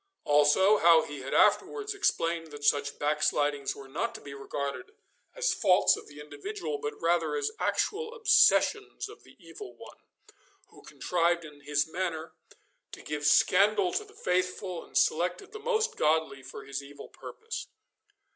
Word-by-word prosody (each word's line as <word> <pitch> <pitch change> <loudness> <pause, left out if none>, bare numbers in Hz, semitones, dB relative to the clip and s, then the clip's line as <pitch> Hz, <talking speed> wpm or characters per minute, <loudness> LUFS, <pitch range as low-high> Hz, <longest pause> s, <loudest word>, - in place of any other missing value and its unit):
Also, 150 +8 +4
how 165 -1 +6
he 145 -1 -8
had 135 +1 -7
afterwards 420 -1 +2
explained 165 - 0
that 145 -1 -11
such 145 0 +1
backslidings 145 -1 0
were 135 - -11
not 195 +12 -3
to - - -9
be 140 - -10
regarded 140 - -5 0.4
us - - +1
faults 185 -4 +4
of - - -11
the 145 0 -13
individual, 150 +1 -6
but 145 +1 -5
rather 170 - +1
as 440 -1 -1
actual 455 +3 -1
obsessions 440 -2 +3
of - - -14
the - - -19
evil 415 - -11
one, - - -13 0.7
who - - -17
contrived 170 -1 -1
in 150 -1 -13
this 145 0 0
manner 160 -2 -4 0.6
to - - -10
give 150 0 -2
scandal 195 +3 +4
to - - -1
the 420 0 -19
faithful, 180 0 -2
and - - -5
selected 180 - +1
the 430 - -8
most 450 0 0
godly 155 -3 +1
for 135 +1 -10
his 140 0 -5
evil 140 +1 -12
purpose. 455 +1 -8
165 Hz, 155 wpm, -29 LUFS, 145-210 Hz, 0.7 s, how